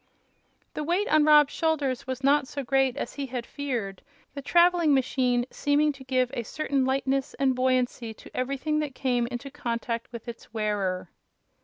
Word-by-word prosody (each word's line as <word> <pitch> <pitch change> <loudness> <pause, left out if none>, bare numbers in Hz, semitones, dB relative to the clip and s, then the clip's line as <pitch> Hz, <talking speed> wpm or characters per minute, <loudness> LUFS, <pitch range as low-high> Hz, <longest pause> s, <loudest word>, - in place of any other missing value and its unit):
The 300 - -3
weight 355 +7 0
on 310 -1 +5
Rob's 300 -2 +6
shoulders 290 -7 -1
was 260 +1 -4
not 280 0 +3
so 285 -1 -5
great 270 0 +1
as - - -4
he 280 -1 -4
had 245 -2 -4
feared, 240 -10 -4 0.3
the 280 - -6
traveling 340 -1 +4
machine 250 -2 +1
seeming 295 +1 +2
to 275 -2 -12
give 255 -1 0
a 240 - -2
certain 275 +2 -1
lightness 270 0 0
and 270 -1 +2
buoyancy 255 -2 0
to - - -15
everything 275 +4 -1
that 295 -4 -3
came 245 -3 0
into 245 +3 -6
contact 235 -4 -3
with 235 0 -9
its 235 -1 -9
wearer. 205 -4 -2
265 Hz, 170 wpm, -27 LUFS, 245-290 Hz, 0.3 s, Rob's